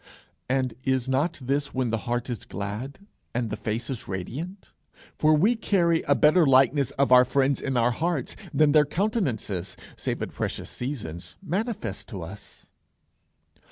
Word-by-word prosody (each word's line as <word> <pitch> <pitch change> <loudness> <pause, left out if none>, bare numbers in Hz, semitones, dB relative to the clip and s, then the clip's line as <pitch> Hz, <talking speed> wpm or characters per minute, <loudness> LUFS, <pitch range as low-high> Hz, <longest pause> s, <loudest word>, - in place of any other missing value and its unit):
And 130 -2 +1
is 130 -2 +1
not 140 +6 +1
this 140 +2 -1
when 130 -3 0
the 115 - 0
heart 120 +1 -1
is 120 -6 -4
glad 110 - -6 0.3
and 120 -2 -1
the - - -1
face 115 +2 -3
is 130 -5 -5
radiant? 145 - -6 0.5
For 155 - +4
we 205 +11 +4
carry 175 -7 +2
a 140 - +5
better 155 +5 +5
likeness 135 -1 +4
of 140 -1 +2
our 125 0 +9
friends 135 +2 +1
in 135 -2 -1
our 120 +1 +3
hearts 160 +1 -2 0.2
than 155 -1 +4
their 150 0 +6
countenances, 145 - -2 0.2
save - - -3
at - - -6
precious - - -3
seasons, 90 - -5
manifest 210 +5 -3
to 95 -8 -6
us. 95 +6 -11
130 Hz, 155 wpm, -26 LUFS, 115-155 Hz, 0.5 s, our